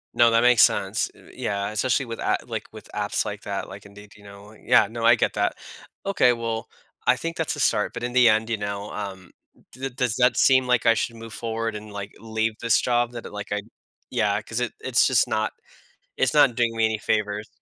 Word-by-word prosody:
No, 120 -1 +6
that 115 0 +3
makes 120 -4 +5
sense, 100 +1 +2
uh, - - -18
yeah, 100 0 -2
especially 125 +4 0
with 115 -1 -7
a - - +1
like, - - -5
with - - -12
apps - - -1
like - - -5
that, - - -4
like, - - -11
Indeed, 100 +1 -14
you 105 - -18
know? 100 +1 -13
Yeah, 105 -1 +3
no, 115 +1 -6
I - - +7
get - - 0
that. - - 0 0.5
Okay, 185 -11 +3
well, 115 -1 -4 0.4
I - - +6
think 165 0 -5
that's - - -2
a - - -8
start, - - +1
but 120 - -6
in 120 0 -3
the 125 -2 +6
end, 110 +1 +2
you 115 - 0
know, 100 0 -5
um, 95 -3 -7 0.4
d 135 +2 -5
does 125 -3 -1
that 125 0 +3
seem 130 -1 +4
like 125 -1 +2
I 115 - +6
should 115 +1 -2
move 115 -1 -10
forward 115 -1 -3
and, 105 0 -8
like, 100 0 -6
leave 110 0 -1
this 115 -1 +3
job 120 -1 +1
that, 120 - -7
uh, - - -8
like, 105 0 -7
I 105 - -1 0.5
Yeah, 105 -4 +1
'cause 115 +1 -4
it 125 - -1
it's 130 -2 +3
just 125 -5 +3
not 110 0 -1 0.7
it's 130 -2 +2
not 140 -6 +5
doing 115 -2 +1
me 115 0 +2
any 110 0 0
favors 105 0 -1
115 Hz, 230 wpm, -24 LUFS, 105-120 Hz, 0.7 s, I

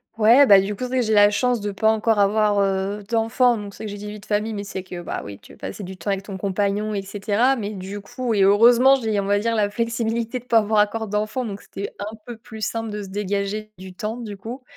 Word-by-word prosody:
Ouais, 235 +5 +6
bah, 200 -1 +8
du 200 +2 -1
coup 255 - -6
c'est - - -3
vrai 260 0 0
que - - -1
j'ai 220 - +1
la 205 0 +7
chance 245 +1 0
de 205 - -2
pas 220 +2 +2
encore 220 0 +1
avoir, 205 0 +3
heu, 195 +1 -1
d'enfant 235 +2 +2
donc 205 -2 -7
c'est 220 - -8
que 205 - -5
j'ai 205 - -7
dit: 210 +1 -7
"vie 210 0 -8
de - - -16
famille" 215 +1 -1
mais 200 - -4
c'est 190 -1 -6
que, 180 -2 -8
bah, - - -4
oui 100 -1 -8
tu - - -18
veux - - -17
passer 205 - -6
du 190 +1 -7
temps 185 +3 -6
avec 195 0 -1
ton 195 -2 -7
compagnon 205 +2 -1
et 195 - -2
cetera 210 +6 +1
mais 210 -4 -4
du 195 +2 -7
coup 245 +2 -3
et 200 - +2
heureusement 235 +7 +6
j'ai 220 -5 -1
on 195 - -2
va 205 0 +3
dire 230 +2 0
la 205 -1 +1
flexibilité 230 +2 -2
de 245 - -20
pas 230 -2 +3
avoir 210 0 +1
encore 220 +1 +1
d'enfant 215 +4 -2
donc 200 -2 -6
c'était 200 - -7
un 210 +2 -5
peu 240 - -7
plus 220 0 -12
simple 225 +1 -2
de 210 -1 -5
se 190 - -9
dégager 205 +1 -3
du 185 0 -10
temps 215 +5 -4
du 210 -4 -7
coup 240 +6 -8
210 Hz, 275 wpm, -22 LUFS, 200-225 Hz, -, bah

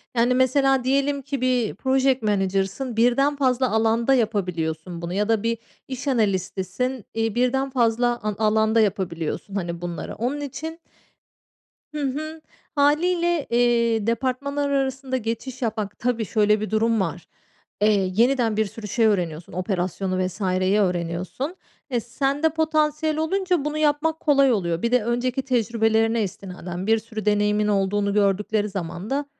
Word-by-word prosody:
Yani, 240 +1 +3
mesela 260 +1 +3
diyelim 275 +2 +1
ki 275 -1 -4
bir 250 -4 +1
project 265 -1 +2
manager'sın, 200 +4 -1
birden 245 +5 +3
fazla 260 -2 +1
alanda 225 +3 +2
yapabiliyorsun 180 -7 -1
bunu 170 +1 -4
ya 205 +3 0
da 225 -2 +2
bir 230 0 0 0.3
iş 260 +1 -6
analistisin, 205 +1 -1
iii, 225 -1 -1
birden 260 +2 +1
fazla 240 -1 +1
a 215 0 -1
alanda 220 +1 +3
yapabiliyorsun, 190 -2 -2
hani, 170 -3 -3
bunları 175 -2 -5
onun 260 +6 -2
için 320 +4 -6 1.2
Hı 300 - -2
hı, 310 +4 -3 0.3
hâliyle, 335 +3 +2
eee, 235 -2 +2
departmanlar 270 +4 -1
arasında 265 -1 -1
geçiş 230 +3 -5
yapmak, 215 -3 -3
tabii 235 -2 0
şöyle 210 0 +2
bir 215 - -3
durum 225 +1 +2
var, 175 -2 -4 0.5
eee, 205 -3 +3
yeniden 235 -1 +2
bir 220 - +2
sürü 210 +1 -8
şey 225 +3 +1
öğreniyorsun, 175 -6 -1
operasyonu 185 0 -1
vs.yi 185 +1 0
öğreniyorsun. 180 - -2 0.4
Eee, 245 - +1
sende 275 +6 0
potansiyel 310 -1 0
olunca 360 -1 0
bunu 300 0 -2
yapmak 310 +1 +1
kolay 275 -3 +4
oluyor. 170 -6 0
Bir 235 - 0
de 250 -3 +3
önceki 245 +3 -1
tecrübelerine 225 -2 +1
istinaden 185 -1 -6
bir 225 0 +4
sürü 220 -1 -7
deneyimin 210 0 +2
olduğunu 200 0 +1
gördükleri 210 +1 +1
zaman 180 +1 -5
da, 285 +2 -1
230 Hz, 140 wpm, -23 LUFS, 200-270 Hz, 1.2 s, kolay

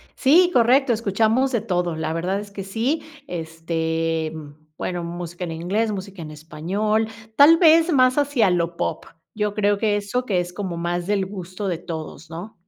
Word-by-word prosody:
Sí, 340 +7 +5
correcto, 250 +1 +4
escuchamos 225 +4 +1
de 235 -4 0
todo, 175 -3 -1
la 160 0 -2
verdad 180 +4 -1
es 205 0 -9
que 200 -1 -6
sí, 230 +11 -1 0.2
este, 165 -1 -2 0.4
bueno, 175 -1 -3
música 175 +1 -6
en 165 - -5
inglés, 190 +7 -1
música 195 -2 -6
en 155 -1 -7
español, 180 +8 -1 0.3
tal 295 +5 +8
vez 330 0 +5
más 255 -3 +4
hacia 280 -8 +3
lo 170 -1 0
pop, - - -2 0.3
Yo 210 -1 -1
creo 205 -1 +2
que 210 0 +1
eso 205 +5 -2
que 190 -6 +1
es 175 0 -6
como 185 -2 -4
más 175 +1 -2
del 200 -2 +1
gusto 190 0 -6
de 175 - -1
todos, 160 -1 -7
¿no? 175 +7 -8
195 Hz, 175 wpm, -22 LUFS, 170-225 Hz, 0.4 s, tal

